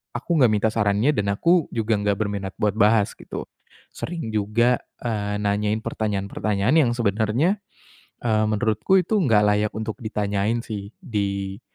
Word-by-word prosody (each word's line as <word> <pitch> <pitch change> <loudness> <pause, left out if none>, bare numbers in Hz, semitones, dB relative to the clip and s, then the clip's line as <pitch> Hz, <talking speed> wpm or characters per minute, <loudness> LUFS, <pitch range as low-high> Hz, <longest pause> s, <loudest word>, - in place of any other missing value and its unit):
aku - - -6
enggak 125 -4 +5
minta 105 +1 +2
sarannya 105 +4 +2
dan 100 -1 0
aku 170 - +3
juga 110 -1 +1
enggak 105 0 +1
berminat 100 -3 -3
buat 105 -1 +2
bahas, 105 -1 +4
gitu. - - -7 0.5
Sering 165 -9 -5
juga, 115 +4 +2 0.2
eee, 105 -3 -2
nanyain 105 +1 0
pertanyaan-pertanyaan 105 +1 -1
yang 130 -7 +4
sebenarnya, 115 - +1 0.7
eee, 110 -1 +2
menurutku 110 - +2
itu 180 +5 -2
enggak 110 - +4
layak 105 +1 +2
untuk 110 0 -4
ditanyain 105 +1 -1
sih, 100 -3 -6
di 100 -3 -3
105 Hz, 145 wpm, -23 LUFS, 100-115 Hz, 0.7 s, enggak